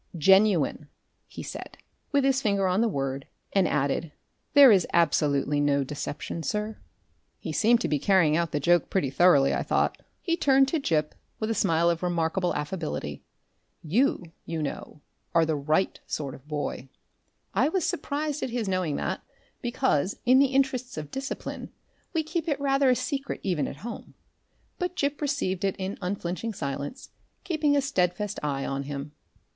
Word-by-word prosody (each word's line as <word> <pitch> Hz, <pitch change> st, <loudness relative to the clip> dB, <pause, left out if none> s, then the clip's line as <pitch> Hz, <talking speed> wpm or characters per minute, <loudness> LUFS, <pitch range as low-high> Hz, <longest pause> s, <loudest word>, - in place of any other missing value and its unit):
"Genuine," 190 Hz, -4 st, +4 dB, 0.4 s
he -, -, -8 dB
said, -, -, -8 dB, 0.3 s
with 285 Hz, -2 st, +3 dB
his 270 Hz, 0 st, +2 dB
finger 200 Hz, -4 st, +1 dB
on 185 Hz, +3 st, +2 dB
the 235 Hz, -, +3 dB
word, 135 Hz, -6 st, -3 dB, 0.3 s
and 195 Hz, -3 st, +3 dB
added, 150 Hz, +3 st, 0 dB, 0.4 s
"There 280 Hz, -3 st, +10 dB
is 190 Hz, -5 st, +4 dB
absolutely 150 Hz, -3 st, +2 dB
no 140 Hz, -1 st, +2 dB
deception, 145 Hz, +3 st, -5 dB
sir." 210 Hz, +5 st, -3 dB, 0.6 s
He 165 Hz, -, -6 dB
seemed 230 Hz, +8 st, +3 dB
to -, -, 0 dB
be 150 Hz, -, 0 dB
carrying 170 Hz, -3 st, +4 dB
out 170 Hz, 0 st, +1 dB
the 150 Hz, -, 0 dB
joke 175 Hz, +4 st, +3 dB
pretty 145 Hz, -9 st, 0 dB
thoroughly, 140 Hz, -3 st, +5 dB
I -, -, 0 dB
thought. -, -, 0 dB, 0.2 s
He 335 Hz, -3 st, 0 dB
turned 270 Hz, -4 st, +4 dB
to 325 Hz, -, 0 dB
Gip 155 Hz, -, 0 dB, 0.3 s
with 220 Hz, 0 st, -1 dB
a -, -, +2 dB
smile 170 Hz, -5 st, +2 dB
of 170 Hz, -1 st, +1 dB
remarkable 175 Hz, +1 st, 0 dB
affability. 150 Hz, -, -4 dB, 0.6 s
"You, 210 Hz, -, +2 dB, 0.2 s
you 165 Hz, -2 st, -3 dB
know, 145 Hz, +1 st, -6 dB, 0.3 s
are 165 Hz, -1 st, +5 dB
the 160 Hz, -1 st, 0 dB
Right 155 Hz, +6 st, 0 dB
Sort 140 Hz, -4 st, -3 dB
of 135 Hz, -, -14 dB
Boy." 145 Hz, -3 st, -4 dB, 0.6 s
I 255 Hz, +9 st, +3 dB
was 365 Hz, 0 st, 0 dB
surprised 300 Hz, -4 st, -2 dB
at -, -, -2 dB
his 235 Hz, -3 st, -2 dB
knowing 185 Hz, -6 st, 0 dB
that, -, -, -2 dB, 0.4 s
because, 240 Hz, -, 0 dB
in 255 Hz, +2 st, +6 dB
the 280 Hz, -, +5 dB
interests 260 Hz, -4 st, 0 dB
of 150 Hz, -2 st, -6 dB
discipline, 270 Hz, 0 st, -5 dB, 0.4 s
we 325 Hz, -2 st, 0 dB
keep 325 Hz, +1 st, -3 dB
it 290 Hz, -3 st, 0 dB
rather 275 Hz, -1 st, +3 dB
a 250 Hz, -, +5 dB
secret 275 Hz, +2 st, -3 dB
even 180 Hz, -7 st, 0 dB
at -, -, -7 dB
home; 240 Hz, -, -8 dB, 0.6 s
but 360 Hz, -1 st, -2 dB
Gip 285 Hz, -3 st, -1 dB
received 280 Hz, -11 st, -1 dB
it 195 Hz, -1 st, +1 dB
in 190 Hz, +1 st, -4 dB
unflinching 185 Hz, +3 st, -3 dB
silence, 140 Hz, -, -5 dB, 0.3 s
keeping 310 Hz, -6 st, +1 dB
a -, -, +3 dB
steadfast 205 Hz, -5 st, -1 dB
eye 140 Hz, -2 st, -2 dB
on 135 Hz, 0 st, -2 dB
him. 140 Hz, +1 st, -5 dB
185 Hz, 170 wpm, -27 LUFS, -, 0.6 s, There